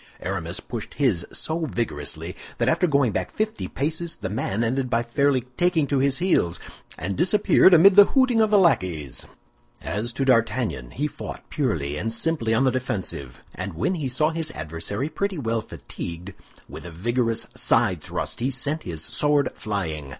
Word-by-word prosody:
Aramis 90 -1 -3
pushed 115 -3 -7
his 110 - +1
so 160 +1 -2
vigorously 95 - -3 0.2
that - - 0
after 180 - +3
going 140 -6 +3
back 95 -2 -2
fifty 215 +1 -2
paces, 160 +4 -2
the - - -5
man 105 0 -1
ended 125 +2 0
by 115 0 +1
fairly 135 +2 +2 0.2
taking 175 -4 +3
to 140 -1 0
his 135 0 +2
heels, 170 - +1 0.4
and 95 +4 -3
disappeared 190 - +5
amid 185 +3 +7
the 205 0 +10
hooting 260 -3 +3
of 220 - +3
the 210 - +5
lackeys. 90 - +1 0.5
As 110 +5 -3
to 135 - -1
D'Artagnan, 115 - +1
he 145 - -3
fought 150 - -7
purely 80 - -1
and 110 +7 -2
simply 115 0 0
on 115 +4 +3
the 130 - +3
defensive; 90 - -4
and 95 -1 -5
when 85 - 0
he 150 -7 -2
saw 150 +5 +1
his 160 -1 -3
adversary 80 - -4
pretty 195 +3 -2
well 115 -5 -1
fatigued, 90 -2 -8 0.3
with - - -9
a 85 - -7
vigorous 115 +6 -1
side - - +2
thrust - - -4
sent 145 +5 -2
his 80 -3 -5
sword 145 +3 +1
flying. 80 -9 -4
120 Hz, 170 wpm, -24 LUFS, 95-155 Hz, 0.5 s, the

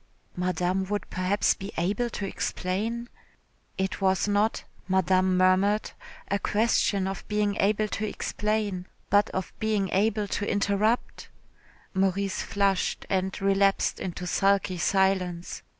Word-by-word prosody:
Madame 180 +1 0
would 205 +2 -3
perhaps 185 +3 +2
be 195 +2 -8
able 200 +8 0
to 205 - -4
explain.... 215 +6 -2 0.7
It 190 +1 -2
was 190 0 +2
not, 205 +2 +1 0.2
Madame 185 0 +2
murmured, 190 +3 +3 0.4
a 200 - 0
question 205 -3 +1
of 195 - -4
being 210 -1 0
able 215 +2 +2
to 215 +1 -2
explain, 210 -3 -2 0.2
but 205 +1 +4
of 190 -1 -4
being 215 -3 0
able 210 +1 +1
to 205 +1 -2
interrupt.... 205 +3 0 0.6
Maurice 195 0 0
flushed 200 -3 0
and 190 0 0
relapsed 195 0 +2
into 180 -1 -5
sulky 195 0 +1
silence. 185 -2 0
195 Hz, 120 wpm, -27 LUFS, 185-205 Hz, 0.7 s, but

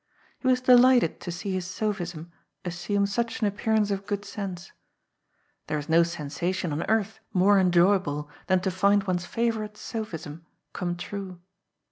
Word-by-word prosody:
He 260 - -3
was 255 -1 +3
delighted 250 -5 +5
to 175 - -5
see 180 +3 -4
his 185 -1 -2
sophism 175 -5 -3 0.3
assume 180 +4 0
such 230 +3 -2
an 220 - +1
appearance 210 +1 +1
of 195 0 -3
good 205 0 -2
sense. 195 -4 -6 1.0
There 150 - -1
is 150 0 -6
no 165 +1 +6
sensation 170 +2 -2
on 150 - -2
earth 220 -1 0
more 195 +2 +5
enjoyable 175 -5 +3 0.2
than 185 -1 +3
to 190 0 0
find 200 +2 +3
one's 180 -2 -2
favourite 220 -2 -1
sophism 170 -9 -6 0.3
come 175 -1 -3
true. 185 0 -6
190 Hz, 150 wpm, -26 LUFS, 175-210 Hz, 1.0 s, no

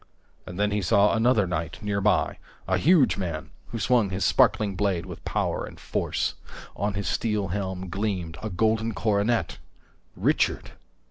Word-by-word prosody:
And 90 +2 -7
then 105 0 +2
he 105 0 0
saw 100 +3 +4
another 115 -2 +3
knight 85 -2 -3
nearby, 105 0 +1 0.3
a - - +1
huge 160 -4 +4
man 85 -5 -4 0.2
who 115 - -5
swung 115 -1 +2
his 95 +1 -1
sparkling 100 -3 +3
blade 95 -3 0
with 90 -2 -9
power - - -1
and - - -9
force. - - -1 0.4
On 100 -1 -2
his 100 0 -3
steel 105 -4 0
helm 95 -1 -3
gleamed 90 -4 -3
a 110 - -3
golden 110 +3 0
coronet! 100 -1 0 0.6
Richard! - - +1
100 Hz, 150 wpm, -26 LUFS, 95-110 Hz, 0.6 s, saw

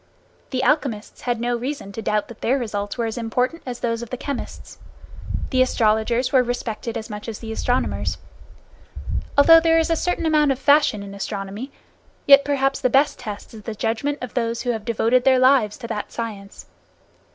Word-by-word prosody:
The 260 -1 -1
alchemists 265 -9 0
had 240 -2 -1
no 240 +1 0
reason 250 -3 -5
to 225 - -6
doubt 210 0 0
that 235 -3 -13
their 260 +4 +2
results 205 -4 -4
were 235 - 0
as 225 +2 -3
important 250 +8 -1
as 245 -1 -5
those 230 -1 -1
of 235 - -7
the 255 - -4
chemists. 280 0 -6 0.7
The 260 -2 +3
astrologers 235 +1 +2
were 260 - +6
respected 235 -2 -3
as 220 - -6
much 210 0 -7
as 220 - -5
the 225 -1 -7
astronomers. 245 +3 -1 1.2
Although 330 +3 +8
there 325 0 +3
is 325 0 +1
a - - +3
certain 355 0 -1
amount 305 -3 +3
of - - -9
fashion 285 -7 +3
in 200 0 -9
astronomy, 200 +5 -5 0.5
yet 280 0 +8
perhaps 270 -1 0
the 255 - +2
best 275 +4 +2
test 215 -4 -7
is 220 - -10
the 220 +1 -6
judgment 235 +7 -1
of 250 - -6
those 230 -1 -1
who 245 - 0
have 220 -3 -5
devoted 235 +2 +2
their 260 -1 +5
lives 255 -5 +4
to 235 - -8
that 210 -2 -4
science. 210 -4 -7
240 Hz, 190 wpm, -22 LUFS, 220-270 Hz, 1.2 s, Although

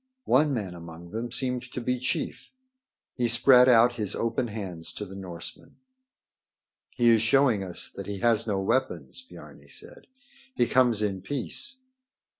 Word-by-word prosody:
One 145 +3 +3
man 105 -9 -3
among 85 0 -11
them 115 +2 -4
seemed 125 0 -1
to - - -3
be 125 +1 -1
chief. 130 - -3 0.6
He 120 -2 0
spread 125 +2 +6
out 120 0 +5
his 105 -3 -2
open 115 +2 -1
hands 95 -7 -6
to 105 - -6
the 95 - -11
Norsemen. 90 -3 -9 1.2
"He 120 -2 +4
is 115 -2 +4
showing 120 -2 +3
us 90 -2 -3
that - - -9
he 100 -1 -4
has 115 +1 +2
no 100 -3 0
weapons," 130 - -2
Biarni 255 - -14
said. 485 +3 -12 0.5
"He 120 - +3
comes 120 -4 +2
in 95 -3 -2
peace." 145 - -3
115 Hz, 155 wpm, -27 LUFS, 100-125 Hz, 1.2 s, spread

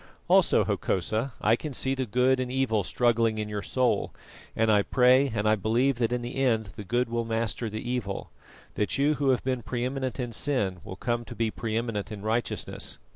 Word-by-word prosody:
"Also, - - +5
Hokosa, 110 +8 -1
I 110 - +4
can 150 +3 -6
see 135 +2 +1
the 130 -2 -2
good 125 +4 +3
and 125 -1 -2
evil 125 -6 +1
struggling 115 +1 +2
in 105 -1 -2
your 105 -1 -3
soul, 130 +2 0 0.4
and 110 0 +3
I 105 -1 +5
pray 130 +5 +4
and 110 -4 -1
I 110 - +5
believe 115 +5 +1
that 115 -1 +1
in 125 -1 -1
the 120 +3 -5
end 110 -6 +1
the 105 - -7
good 120 +5 0
will 115 0 -1
master 115 0 -2
the 110 +2 -6
evil; 120 -6 -3 0.4
that 105 - -1
you 145 +2 +3
who 145 -2 0
have 130 - +2
been 130 -2 -1
pre 120 +1 -3
eminent 130 0 -3
in 120 -2 -2
sin 110 -8 -1
will 95 - -7
come 120 +3 -2
to - - -9
be 115 -1 0
pre 110 0 -3
eminent 115 -4 -3
in 105 -1 -7
righteousness. 115 +2 -2
120 Hz, 210 wpm, -27 LUFS, 110-130 Hz, 0.4 s, Also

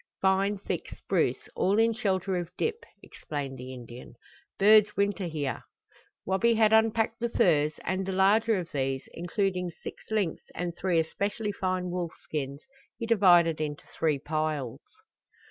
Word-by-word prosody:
"Fine 195 +2 +2
thick 195 - -4
spruce, - - -1
all 195 +2 +2
in 225 +1 +4
shelter 195 -4 -1
of 175 -2 -3
dip," 460 +1 -2 0.2
explained 140 -3 -6
the 130 +1 -7
Indian. 120 -1 -10 0.4
"Birds 210 +1 +6
winter 200 -1 +1
here." 145 -6 -3 0.6
Wabi 195 +5 +2
had 220 -1 +4
unpacked 225 0 +3
the 235 0 -1
furs, 155 -8 +3
and 185 +1 -1
the 190 - -3
larger 205 +4 +3
of 175 -2 -5
these, 135 -1 -1
including 180 +1 -1
six - - -10
lynx 210 -7 0
and 175 -1 -3
three 180 -3 +1
especially 200 +6 -2
fine 185 -2 -2
wolf 175 -2 -3
skins, 140 -1 -4 0.4
he 230 - -4
divided 175 -8 +5
into 150 -1 -4
three 155 -3 +1
piles. 150 -3 -2
185 Hz, 145 wpm, -28 LUFS, 155-205 Hz, 0.6 s, Birds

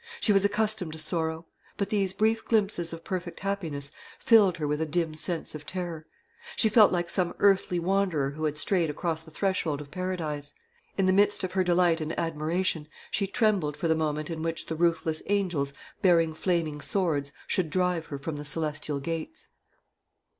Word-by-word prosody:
She 210 - +3
was 195 -1 +4
accustomed 210 -4 +1
to - - -7
sorrow; 160 +1 -1 0.3
but 200 -1 -2
these 200 -3 +2
brief 220 +3 +1
glimpses 200 -6 +1
of 165 0 -7
perfect 180 -2 -4
happiness 160 -8 -3 0.3
filled 205 -6 +5
her 150 -2 -2
with 150 +1 -1
a 160 - 0
dim 160 0 0
sense 160 +2 -2
of 155 -1 -7
terror. 175 -4 -5 0.5
She 220 - +3
felt 215 -1 +7
like 175 -1 0
some 175 0 0
earthly 195 -3 +3
wanderer 175 -6 +1
who 155 +2 -3
had 150 -1 -1
strayed 170 0 +1
across 160 +2 -2
the 160 - -14
threshold 160 -3 -1
of 145 -1 -10
Paradise. 165 -6 -4 0.4
In 195 - +3
the 185 - +4
midst 205 +1 +3
of 185 - -2
her 185 0 +2
delight 175 -2 +3
and 155 +1 -3
admiration, 165 0 -1 0.2
she 195 - 0
trembled 195 -8 +1
for 170 - -1
the 160 - +4
moment 155 0 -1
in 160 -1 -4
which 165 0 -2
the 160 - -4
ruthless 165 -1 +1
angels, 180 -9 0 0.3
bearing 165 -3 +4
flaming 160 -3 -1
swords, 150 -6 0
should 180 -4 0
drive 180 0 0
her 140 - -5
from 145 +2 -5
the 145 - -5
celestial 150 -1 -2
gates. 165 - -5
170 Hz, 180 wpm, -28 LUFS, 155-190 Hz, 0.5 s, felt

